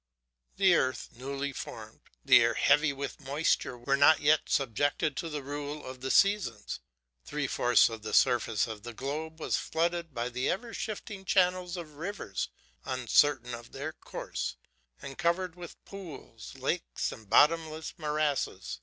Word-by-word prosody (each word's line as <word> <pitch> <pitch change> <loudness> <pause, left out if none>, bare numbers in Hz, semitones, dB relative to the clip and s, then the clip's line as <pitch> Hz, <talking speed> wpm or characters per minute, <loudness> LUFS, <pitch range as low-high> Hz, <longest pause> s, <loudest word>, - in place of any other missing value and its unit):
The 190 -2 +5
earth, 130 -6 +1
newly 140 +3 -4
formed, - - -8 0.3
the - - +8
air - - +2
heavy 150 0 +4
with 140 +1 -6
moisture, 140 -2 0
were 120 +3 +1
not 145 +3 +6
yet 150 +1 +3
subjected 140 +3 +1
to 165 - -3
the 150 -2 -4
rule 145 +1 -5
of 130 0 -8
the 135 - -3
seasons. 195 - +2 0.4
Three 150 - -3
fourths 120 -2 +4
of 115 -2 -6
the 110 - -5
surface 115 -3 +3
of 110 -2 -7
the 120 +2 -8
globe 155 +5 -4
was - - 0
flooded 170 0 -1
by 120 -1 -2
the 125 +2 -1
ever 230 +5 -2
shifting 210 -2 -5
channels 180 -1 +2
of 155 -4 -8
rivers 170 - -4 0.3
uncertain 130 0 +2
of 120 0 -9
their 140 +4 -4
course, - - -5 0.5
and 135 -1 -8
covered 175 +1 0
with 175 -1 -10
pools, 150 - -10
lakes, 135 +6 -2
and 110 -4 -12
bottomless 160 +2 +3
morasses. 150 - -1
145 Hz, 155 wpm, -30 LUFS, 130-165 Hz, 0.5 s, the